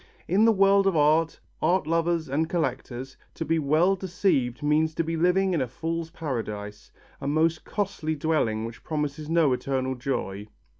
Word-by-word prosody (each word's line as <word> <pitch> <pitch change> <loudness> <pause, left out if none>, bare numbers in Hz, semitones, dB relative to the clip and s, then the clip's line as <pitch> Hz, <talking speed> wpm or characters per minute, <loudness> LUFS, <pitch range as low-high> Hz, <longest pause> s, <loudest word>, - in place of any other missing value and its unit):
In 200 +5 +4
the 230 - +6
world 195 -1 +4
of 190 - +2
art, 155 +2 +3 0.2
art 180 +4 +2
lovers 165 0 0
and 155 +5 -1
collectors, 135 -5 -3 0.2
to - - -4
be 165 +1 +1
well 155 +6 +3
deceived 180 -10 0
means 155 +1 +2
to 165 - 0
be 165 +1 -2
living 180 +3 +2
in 160 - +1
a 130 - -1
fool's 165 +5 -4
paradise, 105 -10 -5 0.3
a 140 - -3
most 160 +2 +1
costly 185 -6 -2
dwelling 140 -8 0
which 115 +1 -9
promises 150 0 -3
no 165 -5 +3
eternal 130 0 -1
joy. 120 -6 -3
155 Hz, 165 wpm, -26 LUFS, 135-170 Hz, 0.3 s, the